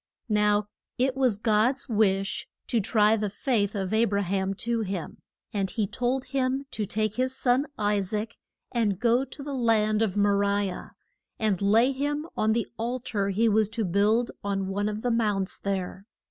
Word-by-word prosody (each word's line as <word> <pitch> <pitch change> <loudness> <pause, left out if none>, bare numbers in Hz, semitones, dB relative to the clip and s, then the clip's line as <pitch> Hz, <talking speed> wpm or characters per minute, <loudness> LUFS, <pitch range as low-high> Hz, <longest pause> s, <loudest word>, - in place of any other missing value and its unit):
Now 210 -1 +3 0.3
it 260 +1 +1
was 255 -6 +2
God's 225 +6 +1
wish 195 -4 +1 0.2
to 235 - +1
try 215 +1 +3
the 210 -2 -1
faith 205 -1 0
of 195 0 -2
A 225 +2 +4
bra 200 -1 0
ham 190 +1 -1
to 235 +3 -1
him. 190 -5 -4 0.3
And 195 -2 -1
he 210 +3 -1
told 250 +5 -1
him 265 0 -1
to 210 -2 -3
take 215 +1 -1
his 255 +1 0
son, 260 +3 +2
I 205 -1 +1
saac, 210 +3 -3 0.4
and 220 -6 +1
go 240 +2 +3
to 275 +2 -9
the 285 0 -5
land 220 -4 +2
of 205 -3 0
Mo 205 0 +4
ri 200 -1 +1
ah, - - -8 0.5
and 210 -4 0
lay 225 +6 +4
him 290 +3 -2
on 220 0 +2
the 230 0 0
al 240 +3 -1
tar 200 -5 -2
he 215 +4 +2
was 215 -1 +3
to 225 -1 -1
build 210 +6 +2
on 195 -1 -1
one 205 +2 -1
of 215 +1 -5
the 245 - +1
mounts 210 -4 0
there. 195 0 -3
215 Hz, 190 wpm, -27 LUFS, 200-240 Hz, 0.5 s, A